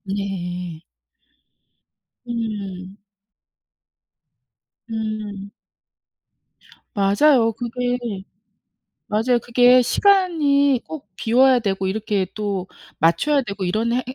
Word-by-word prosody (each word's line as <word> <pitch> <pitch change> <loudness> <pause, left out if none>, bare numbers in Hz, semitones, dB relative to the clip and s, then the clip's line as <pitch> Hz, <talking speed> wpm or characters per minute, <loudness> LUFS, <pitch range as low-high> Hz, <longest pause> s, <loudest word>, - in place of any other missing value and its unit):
네. 180 -4 -5 1.5
음. 200 -5 -5 1.9
음. 215 -3 -5 1.4
맞아요 225 +4 +3
그게. 245 +2 -2 1.1
맞아요 225 +4 +1
그게 245 +1 +5
시간이 290 - +2
꼭 305 -9 -9
비워야 255 +4 +4
되고 195 -4 -2
이렇게 200 -1 -1
또 200 -3 -3 0.3
맞춰야 275 - +2
되고 200 -4 -5
이런 220 +6 0
해 250 +1 0
행 255 - -7
220 Hz, 150 characters per minute, -21 LUFS, 195-250 Hz, 1.9 s, 그게